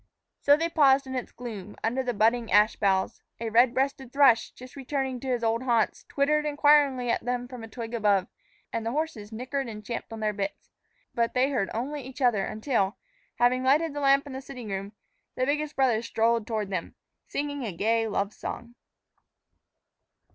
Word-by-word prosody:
So 285 +1 +5
they 330 +2 0
paused 275 -4 +4
in 260 - -6
its 255 -1 -4
gloom, 215 -5 -8
under 245 +4 0
the 250 -1 -1
budding 225 +2 +2
ash 210 +2 +5
boughs. 190 -2 0 0.2
A 225 -1 -3
red 235 +2 +5
breasted 265 -1 -1
thrush, 270 -5 +5
just 255 0 -13
returned 265 -2 -3
to 270 - -6
his 245 -2 -1
old 225 +1 +1
haunts, 235 -4 0
twittered 300 +2 +2
inquiringly 290 -4 +3
at - - -1
them 245 0 -2
from 245 -2 -9
a - - -7
twig 230 0 -7
above, 205 -4 +2 0.5
and 230 - -2
the 225 - -1
horses 285 -9 -3
nickered 260 +4 -3
and 210 -1 -9
champed 235 +1 -5
on 225 - -6
their 215 -1 0
bits. 200 -1 -5 0.4
But 235 +1 0
they 260 +3 +3
heard 215 -8 0
only 280 +6 -3
each 260 +1 -10
other 240 -7 +3
until, 215 -3 -1 0.4
having 250 +1 +2
lighted 290 +4 +3
the 290 - -4
lamp 275 0 +4
in 280 - -8
the 265 - -5
sitting 250 -5 -9
room, 195 +1 -4 0.4
the 255 - 0
biggest 300 +2 -1
brother 250 -5 +2
strolled 230 -1 +1
toward 215 -3 -2
them, 180 -3 -4 0.3
singing 285 -1 -3
a 220 - -3
gay 225 +6 +1
love 205 -1 -1
song. 235 0 -7
245 Hz, 190 wpm, -27 LUFS, 220-275 Hz, 0.5 s, So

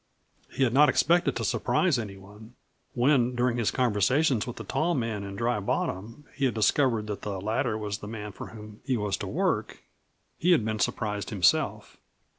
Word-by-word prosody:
He 135 - -1
had 120 -3 +2
not 145 +2 +6
expected 170 +6 +3
to - - -2
surprise 175 -9 +1
any 100 -4 -6
one. 105 +5 -14 0.4
When 125 -1 +3
during 120 0 +1
his 115 -3 +1
conversation 125 +3 +2
with 120 - -5
the - - -7
tall 170 +2 0
man 115 -5 -2
in 100 0 -7
Dry 120 +1 0
Bottom 105 +6 -3
he 140 - -1
had 125 - 0
discovered 115 0 +2
that 105 -1 -5
the 100 -2 -4
latter 110 +3 -1
was 105 -2 -4
the 105 - -8
man 105 -1 -6
for - - -9
whom 105 -1 -12
he 130 -1 0
was 105 -2 -1
to - - -5
work - - -1 0.6
he 180 +2 +4
had 140 -10 +2
been 110 -1 -2
surprised 105 -4 -2
himself. 90 -8 +1
115 Hz, 190 wpm, -27 LUFS, 105-130 Hz, 0.6 s, not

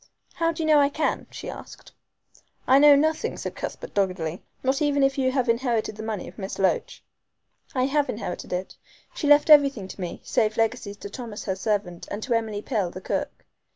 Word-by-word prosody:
"How 330 -1 +1
do 325 0 -4
you - - -1
know 305 -1 +6
I 280 0 +4
can?" 305 +2 -1
she - - -8
asked. - - -10 0.7
"I 265 +2 +6
know 290 0 +8
nothing," 310 +2 0
said - - -5
Cuthbert - - -6
doggedly, 180 -4 -1 0.2
"not 265 +2 +1
even 285 -2 +2
if 270 0 +3
you 260 -1 +1
have 255 -2 0
inherited 230 -2 0
the 215 - -7
money 220 -3 -4
of - - -12
Miss 195 0 -5
Loach." 195 -1 0 0.7
"I 255 - +2
have 285 +1 +1
inherited 210 -5 -5
it. 180 +1 -3 0.4
She 345 -12 -2
left 295 +2 +6
everything 275 -9 +6
to 190 - -9
me, 175 - -5
save 215 0 0
legacies 225 -3 -1
to 205 - -8
Thomas 230 -3 -7
her 190 - -1
servant, 195 -3 -2
and 205 +2 -5
to 245 - -1
Emily 220 -2 -1
Pill, 210 -8 -1
the 180 - -8
cook. - - -4
230 Hz, 200 wpm, -25 LUFS, 205-280 Hz, 0.7 s, know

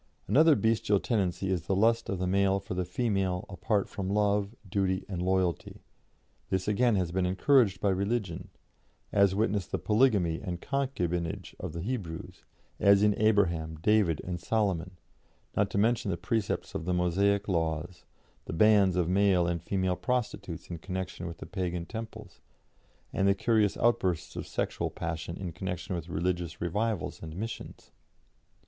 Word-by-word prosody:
Another 155 +2 +6
bestial 110 -3 +2
tendency 95 -4 -1
is 90 -3 -2
the 95 - +1
lust 115 +3 +2
of 95 - -1
the 90 - -1
male 95 +1 +2
for 95 -1 -6
the 90 0 -1
female 95 -2 -1
apart 100 +1 0
from 95 -2 -4
love, 105 +1 +1
duty, 95 0 0
and 95 -3 -4
loyalty; 95 -1 -1 0.7
this 95 0 -1
again 115 +2 +3
has 90 -3 0
been 90 0 +1
encouraged 100 +1 +3
by 100 - +1
religion, 95 -2 -2 0.6
as 100 -1 +4
witness 105 -2 0
the - - -2
polygamy 105 -8 +2
and 85 -2 -4
concubinage 90 - -2
of - - -5
the 85 - -4
Hebrews 95 -8 -5 0.4
as 100 0 +5
in 105 0 +5
Abraham, 85 -7 +2
David, 85 -1 +2
and 90 -1 -4
Solomon, 95 -4 -1 0.6
not 100 -1 +2
to - - -3
mention 110 0 +2
the 85 - -1
precepts 105 +4 -2
of - - -4
the 90 0 0
Mosaic 100 +3 +2
laws 80 -1 -2 0.4
the - - -5
bands 100 0 +5
of 90 -2 +1
male 95 -1 +3
and 85 -1 -1
female 95 0 0
prostitutes 125 +2 -3
in 85 - -5
connection 95 0 -5
with 85 0 -7
Pagan 90 -3 -2
temples, 110 -3 -8 0.7
and 95 - +2
the 100 - +4
curious 110 -1 +2
outbursts 95 -8 +1
of - - -5
sexual - - -2
passion 85 0 -5
in 90 -3 -5
connection 90 +1 -4
with 85 0 -6
religious 85 0 -2
revivals 105 +3 -2
and 80 -1 -7
missions. 115 +5 -7
95 Hz, 155 wpm, -29 LUFS, 90-105 Hz, 0.7 s, Another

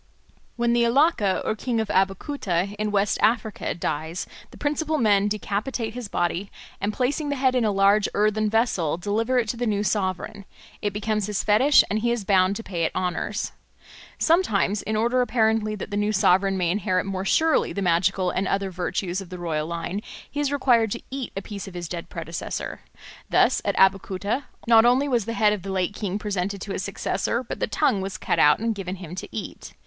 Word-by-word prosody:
When 235 0 +1
the 240 - +3
Alake 235 - +2
or 215 - 0
king 235 +1 -2
of 220 -2 -2
Abeokuta 195 - 0
in 215 0 0
West 205 0 +1
Africa 220 -1 0
dies, 160 +1 -3 0.2
the - - -14
principal 305 +1 -1
men 205 -5 +3
decapitate 215 +3 -2
his 245 -2 -6
body, 175 +1 -1 0.3
and 205 +1 0
placing 280 +6 -1
the 285 - 0
head 260 -1 +2
in 250 -2 +2
a 215 - +2
large 200 +1 +3
earthen 215 +1 +2
vessel 205 -9 +1
deliver 220 +7 0
it 235 -3 +2
to 235 - -2
the 240 0 -1
new 205 -1 0
sovereign; 200 0 -2 0.4
it 205 - -1
becomes 210 0 -1
his 210 -2 -1
fetish 255 +8 +5
and 210 +3 -1
he 235 +2 0
is 235 -4 -1
bound 190 -1 +3
to 225 - -6
pay 175 -6 -3
it - - -1
honours. 185 +3 -2 0.7
Sometimes, 215 - +2
in 220 - -3
order 240 +4 +2
apparently 220 -3 +1
that 205 - -7
the 205 - -1
new 205 +1 +1
sovereign 195 -1 +3
may 175 -2 +1
inherit 185 -2 0
more 190 -1 -3
surely 320 +10 +2
the 200 - -3
magical 180 +1 +2
and 190 +1 -1
other 195 0 -1
virtues 180 +1 -2
of 185 - -10
the 180 - -7
royal 160 -3 -2
line, 170 +4 -4 0.3
he 290 - -4
is 290 -1 0
required 245 -5 +3
to 235 - -5
eat 270 -2 -4
a 195 - -3
piece 200 -2 -7
of 190 - -10
his 175 -1 -4
dead 170 0 -6
predecessor. 165 0 -5 0.5
Thus - - +3
at - - 0
Abeokuta 195 +6 +1 0.2
not 225 -1 +7
only 250 +4 +4
was 240 -6 +1
the 230 - -3
head 215 -2 +3
of 210 - -4
the 195 - -5
late 190 +1 -1
king 200 -2 -3
presented 200 -1 -2
to 200 - -5
his - - -2
successor, 200 +4 -2
but 235 - -6
the - - 0
tongue 205 -2 +1
was 190 0 -4
cut - - -1
out 150 0 +6
and 225 +1 -1
given 190 -2 -5
him 180 -3 -9
to 185 - -6
eat. 215 - -7
205 Hz, 205 wpm, -24 LUFS, 190-230 Hz, 0.7 s, not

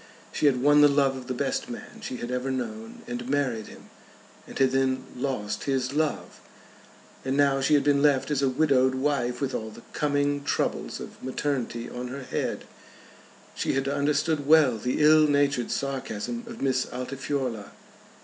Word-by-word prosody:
She 150 - +2
had 125 -3 +2
won 145 +1 +6
the 145 - +8
love 140 -1 +2
of 130 -1 -8
the 130 - -2
best - - -2
man - - -9
she 125 - -5
had 120 +1 -5
ever 125 +1 -2
known, 115 -4 -5
and 120 +1 -5
married 130 -6 0
him, - - -14 0.6
and - - -8
had 135 -1 +3
then 130 -1 +1
lost 125 -5 -3
his 135 -1 0
love! 145 - -2 0.8
And 135 +1 -1
now 140 -1 +3
she 150 +3 +4
had 145 - +3
been 140 -1 +3
left 145 -1 +3
as 140 -2 +1
a 135 - +3
widowed 130 -2 +3
wife, 130 -3 0
with 135 -1 -1
all 110 - -3
the 115 +2 -13
coming 145 -1 0
troubles - - -1
of - - -10
maternity 130 -3 -2
on 125 +1 -6
her 135 +2 -6
head. - - -3 0.9
She - - -1
had 135 0 0
understood 145 +1 0
well 150 -7 +5
the 125 +6 0
ill 155 0 +7
natured 145 -4 +1
sarcasm 140 - -3
of 230 -7 -7
Miss 130 -1 +1
Altifiorla. 130 -3 -3
135 Hz, 175 wpm, -26 LUFS, 125-145 Hz, 0.9 s, the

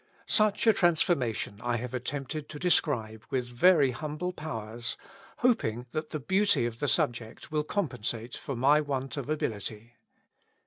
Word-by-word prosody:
Such 215 -1 +2
a 225 - +7
transformation 155 - +1
I 120 0 0
have 125 +1 -5
attempted 140 +4 -4
to 150 - -7
describe 120 -10 +1
with 130 -2 -1
very 140 +3 +4
humble 155 +8 -4
powers, 115 -7 -4 0.4
hoping 125 - +1
that 155 0 -3
the 155 - -3
beauty 190 - +3
of 115 -1 -4
the - - 0
subject 120 +3 0
will 150 -1 +1
compensate 125 - -3
for 140 - -5
my 140 +5 +4
want 135 -2 -3
of 140 -1 -5
ability. 115 -4 -3
135 Hz, 145 wpm, -29 LUFS, 120-155 Hz, 0.4 s, a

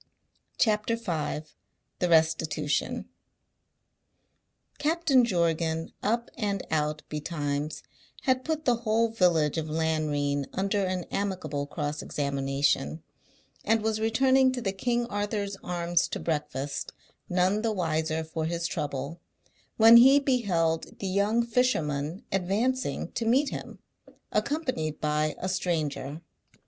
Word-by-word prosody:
CHAPTER 215 0 +2
V 160 -7 -3 0.5
THE 180 - +1
RESTITUTION 160 -2 +1 1.7
Captain 305 -4 +3
Jorgan, 165 -5 0
up 235 +3 -1
and 205 -4 -2
out 150 -1 0
betimes, 150 -1 -3 0.4
had 260 -1 +2
put 315 -1 -2
the 245 -2 +3
whole 230 0 +1
village 170 -8 +2
of 155 0 -4
Lanrean 150 -3 0
under 195 +1 0
an 185 -1 -1
amicable 160 -8 -2
cross 150 0 -3
examination, 135 - -1 0.6
and 225 0 +2
was 220 0 0
returning 260 +4 +4
to 255 - -3
the 200 -5 -1
King 240 +5 0
Arthur's 205 -2 -2
Arms 175 -1 0
to - - -4
breakfast, 145 -3 -3 0.4
none 185 +4 +2
the 225 0 0
wiser 160 -4 -1
for 160 0 -4
his 170 +1 -2
trouble, 145 +1 -3 0.6
when 225 +1 +9
he 265 +4 +8
beheld 185 - 0
the - - -6
young 205 +5 +2
fisherman 170 - 0
advancing 210 +8 0
to - - -3
meet 260 +6 +3
him, - - -7 0.5
accompanied 255 - -1
by 150 0 0
a 185 - -3
stranger. 160 -5 -2
180 Hz, 115 wpm, -28 LUFS, 155-225 Hz, 1.7 s, when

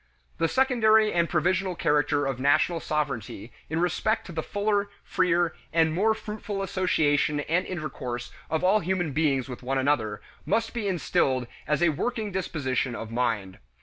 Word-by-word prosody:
The 165 - +3
secondary 220 -3 +4
and 170 -1 +2
provisional 185 +2 +1
character 150 -2 +2
of 135 -2 -2
national 155 +5 +3
sovereignty 135 -9 -3 0.2
in 160 +2 -1
respect 195 +5 0
to - - -8
the 160 -1 -2
fuller, 205 +2 0
freer, 175 -3 +1 0.2
and 160 -1 +3
more 215 +6 +2
fruitful 210 -2 -5
association 150 -6 +1
and 170 +5 0
intercourse 135 -8 -5 0.2
of 160 +2 -1
all 195 +4 +4
human 175 -3 -1
beings 140 -3 +1
with 125 -2 -7
one 135 +2 -1
another 130 -6 +1 0.2
must 225 0 0
be 230 -4 -2
instilled 135 -8 +1 0.2
as 150 +3 +1
a 170 - +5
working 215 - -2
disposition 140 -9 -1
of 115 -1 -6
mind. 110 -6 -1
160 Hz, 155 wpm, -26 LUFS, 135-190 Hz, 0.2 s, a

